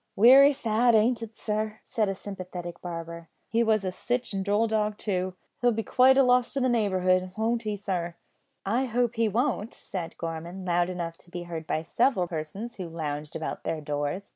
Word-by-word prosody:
"Wery 265 +7 +8
sad, 235 -2 +2
ain't 230 +2 +3
it, 225 -1 -8
sir?" 215 0 -2
said 220 -5 0
a 195 - -2
sympathetic 180 -3 -7
barber. 170 -1 -7 0.2
"He 230 +1 +2
was 220 -2 +3
sitch 245 -2 -2
a 195 - -1
droll 205 +3 +2
dog 215 -1 0
too. 185 -3 -2 0.3
He'll 245 0 +4
be 225 +1 -2
quite 260 +3 +5
a 275 - +7
loss 250 -1 +3
to 275 - 0
the 255 -1 +2
neighbourhood; 185 -5 +1
won't 230 +1 +1
he, 210 -2 -3
sir?" 180 -4 -3 0.5
"I 235 +7 +1
hope 240 -1 0
he 230 -2 +1
won't," 230 0 -1
said 175 -4 -6
Gorman, 170 +3 -5
loud 175 0 +2
enough 170 -2 -5
to - - -19
be 175 0 -6
heard 165 -2 -6
by 155 - -1
several 210 +2 +2
persons 175 +8 -6
who 180 -3 -5
lounged 150 -2 -5
about 160 - -4
their 160 - -2
doors. 145 +5 -3
200 Hz, 190 wpm, -27 LUFS, 175-230 Hz, 0.5 s, Wery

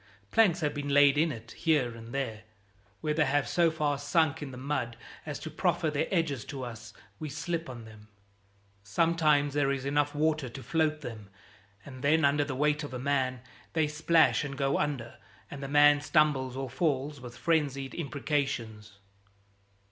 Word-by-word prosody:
Planks 180 -6 +4
have 150 -1 0
been 145 -1 -4
laid 140 0 +6
in 155 +2 +2
it 115 -3 -9
here 145 -7 +1
and 115 0 -10
there. 125 -5 -3 0.6
Where 150 - 0
they 150 0 +2
have 140 +1 +1
so 170 -1 +3
far 150 -3 -1
sunk 160 +1 +1
in 145 - -5
the 130 - -9
mud 130 -3 -3 0.3
as - - -3
to - - -7
proffer 155 - 0
their 150 - 0
edges 160 -9 0
to 135 -3 -6
us 120 -3 -8 0.3
we 155 - -5
slip 165 +2 -3
on 120 -3 -8
them. 110 -1 -14 0.7
Sometimes 150 - +2
there 145 -1 +2
is 135 -1 -3
enough 145 +1 +1
water 155 -3 +1
to 130 +2 -9
float 155 -2 0
them, 110 -6 -8 0.6
and 130 -2 -10
then 155 +2 +4
under 145 +1 +3
the 140 -2 -4
weight 150 +2 +1
of 140 -3 -6
a - - -2
man 130 -2 0 0.3
they 160 -2 +2
splash 155 +2 +3
and 140 -2 -5
go 135 0 +1
under, 135 -6 -3 0.3
and 140 - -7
the 135 - -4
man 145 +1 +5
stumbles 140 -3 +2
or 135 0 -3
falls, 140 0 -1
with 120 -1 -10
frenzied 140 -5 0
imprecations. 135 -8 -3
145 Hz, 180 wpm, -29 LUFS, 130-150 Hz, 0.7 s, laid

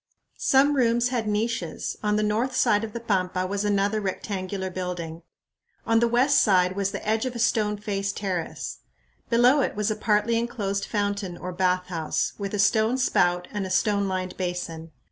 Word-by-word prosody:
Some 280 +2 +4
rooms 240 -1 +2
had 235 -4 -2
niches. 210 -5 -2
On 210 -1 +1
the 215 - +1
north 225 +5 0
side 210 -3 +3
of 215 -1 -5
the 235 - -4
pampa 185 -5 0
was 200 +2 -2
another 205 +1 +1
rectangular 190 -1 -3
building. 175 -3 -5 0.6
On 225 0 +3
the 235 - +3
west 250 +5 +4
side 185 -3 +3
was 195 -1 0
the - - -6
edge 220 +3 +1
of 250 - -5
a - - -3
stone 215 -3 +1
faced 200 -1 -3
terrace. 185 -5 -4 0.5
Below 245 +4 +5
it - - -1
was 210 +1 0
a - - -1
partly 220 +2 +1
enclosed 200 -4 -2
fountain 200 -4 -2
or 180 - -6
bathhouse, 180 -3 -1
with 200 0 -3
a - - -1
stone 220 +4 +3
spout 180 -8 +2
and 210 -2 -3
a 190 - -4
stone 200 +1 +1
lined 185 -1 -3
basin. 175 -3 -4
205 Hz, 180 wpm, -25 LUFS, 185-225 Hz, 0.6 s, Below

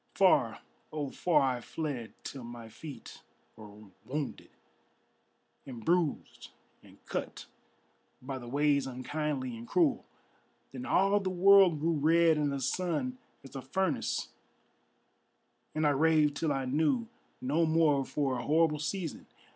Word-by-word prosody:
Far, - - +3 0.3
oh 145 -3 -4
far 155 -5 +2
I - - -9
fled 140 -6 -5
till 135 -3 -7
my 120 -1 -9
feet 145 +6 -10 0.3
were 105 0 -13 0.2
wounded 140 +4 -5 1.2
And 120 -4 -9
bruised 170 -3 -1 0.3
and - - -18
cut - - -5 0.7
by 130 +1 -6
the 120 - -10
ways 140 +1 +2
unkindly 130 0 -3
and 115 +1 -9
cruel. 315 -7 +2 0.7
Then 250 +1 -7
all 195 +2 +3
the 195 -2 -2
world 185 -2 +6
grew 165 +1 +1
red 165 +2 +4
and 145 -1 0
the 140 -1 -3
sun 185 - -2 0.2
as 135 - -13
a 135 - -4
furnace, 190 +9 -1 1.5
And 155 0 +1
I 145 - +4
raved 150 0 +3
till 155 +1 -1
I 135 -1 -1
knew 160 - +1 0.3
no 155 +6 +1
more 155 -3 +3
for 135 -2 -1
a - - -5
horrible 155 0 +2
season. 165 +1 -4
150 Hz, 135 wpm, -31 LUFS, 135-165 Hz, 1.5 s, world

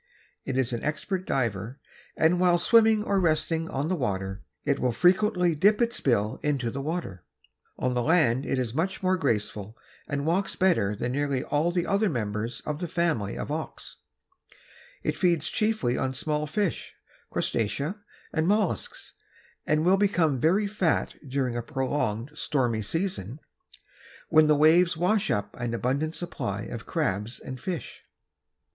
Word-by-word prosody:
It 135 -1 -2
is 125 -2 0
an 120 - -3
expert 180 +5 -2
diver 115 0 -2 0.4
and 165 +3 +3
while 180 -1 +4
swimming 220 +3 +5
or 200 -2 +1
resting 165 -1 +1
on 140 +3 -2
the 185 - 0
water 95 - -2 0.3
it 140 -1 +1
will 125 - +1
frequently 180 - +3
dip 205 +7 +3
its 235 0 +1
bill 110 -5 +1
into 135 -6 -1
the 140 - -4
water. 145 - -4 0.5
On 125 0 0
the 125 - +1
land 135 -4 +3
it 135 - -1
is 125 -3 -2
much 185 +7 -2
more 185 0 +3
graceful 110 - -2 0.3
and 140 0 -2
walks 185 +5 0
better 170 - +2
than 120 +4 -2
nearly 140 -1 -1
all 150 +3 +1
the 175 -1 0
other 200 +1 +2
members 110 - -3
of 150 0 -3
the 175 - -3
family 160 - 0
of - - -4
auks. 155 +1 -6 1.1
It - - 0
feeds 170 -4 +2
chiefly 215 - 0
on 130 0 -1
small 150 +2 -2
fish, 200 +3 -2 0.3
crustacea 140 - -1 0.3
and 160 +1 +1
mollusks 205 -2 -1 0.5
and 155 +1 +2
will 190 +2 +5
become 175 -9 +2
very 185 - +3
fat 195 -5 0
during 130 -2 -1
a 120 - -1
prolonged 130 -2 -2
stormy 125 -7 0
season 150 - -3 0.9
when 155 -1 +6
the 150 - +5
waves 160 +3 +5
wash 205 +5 +1
up 105 0 -1
an 120 -1 -2
abundant 140 +7 -1
supply 105 - -4
of 115 +1 -7
crabs 115 - -2
and 130 -1 -8
fish. 180 0 -5
150 Hz, 155 wpm, -27 LUFS, 120-180 Hz, 1.1 s, when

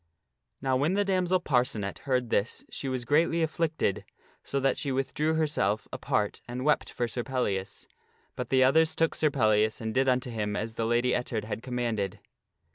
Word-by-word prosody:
Now 130 -1 +2
when 150 +8 +1
the 205 0 +2
damsel 185 -1 +2
Parcenet 125 - 0
heard 125 -3 +1
this 105 +4 0
she 135 - -4
was 130 -2 -3
greatly 165 +4 +3
afflicted, 160 - 0 0.4
so 140 - -2
that 135 0 +2
she 140 - -3
withdrew 150 +4 0
herself 150 -9 0
apart - - -1
and 125 +2 -4
wept 150 - +2
for 120 - -2
Sir 120 +1 -3
Pellias. 105 -8 -2 0.5
But 125 -1 -4
the 130 -1 +4
others 160 +5 +4
took 165 0 +2
Sir 155 - +2
Pellias 110 -5 +2
and 110 -2 -3
did 135 +2 +3
unto 125 -1 0
him 105 -2 -2
as 110 +2 -3
the 115 0 -1
Lady 120 +2 +2
Ettard 120 -3 -1
had 110 +1 -5
commanded. 115 -6 -2
130 Hz, 180 wpm, -28 LUFS, 115-150 Hz, 0.5 s, the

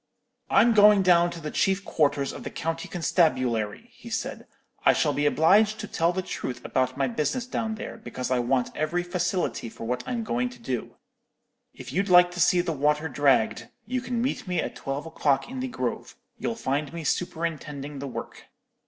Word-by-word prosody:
"'I'm 235 0 +5
going 210 -2 +7
down 175 -1 +5
to 170 -1 -7
the 150 -2 -5
chief 195 0 +1
quarters 145 -3 +1
of - - -8
the - - -4
county 165 0 -3
constabulary, 130 - 0
he 240 -1 -12
said. 225 - -4 0.4
'I - - +6
shall 150 -2 +1
be 145 +1 +1
obliged 205 +9 +4
to 210 - -5
tell 170 -1 +1
the 185 +1 -3
truth 130 -7 -5
about 130 0 0
my 135 -1 +1
business 155 - -1
down 225 -3 -2
there, 220 - -7
because 130 - -5
I 125 - +3
want 125 +1 0
every 155 +4 -1
facility 175 -9 -2
for 110 - -10
what 125 +2 -2
I'm 240 -2 -2
going 125 - -1
to 125 0 -14
do. 120 0 -4 0.8
If 130 0 -9
you'd 195 +4 0
like 175 0 +7
to 175 - -7
see 180 +1 +4
the 175 -1 -2
water 150 +2 +1
dragged, 130 -4 +2 0.2
you 250 +3 -2
can 240 -1 -2
meet 255 -5 -2
me 180 -2 0
at - - -3
twelve 135 +2 -4
o'clock 150 -4 0
in 260 - -5
the 260 - -2
grove. 260 - -4 0.2
You'll 230 - -3
find 145 -7 -2
me 170 -1 -6
superintending 150 -3 -3
the 140 - -5
work.' 130 - -7
165 Hz, 195 wpm, -26 LUFS, 135-195 Hz, 0.8 s, going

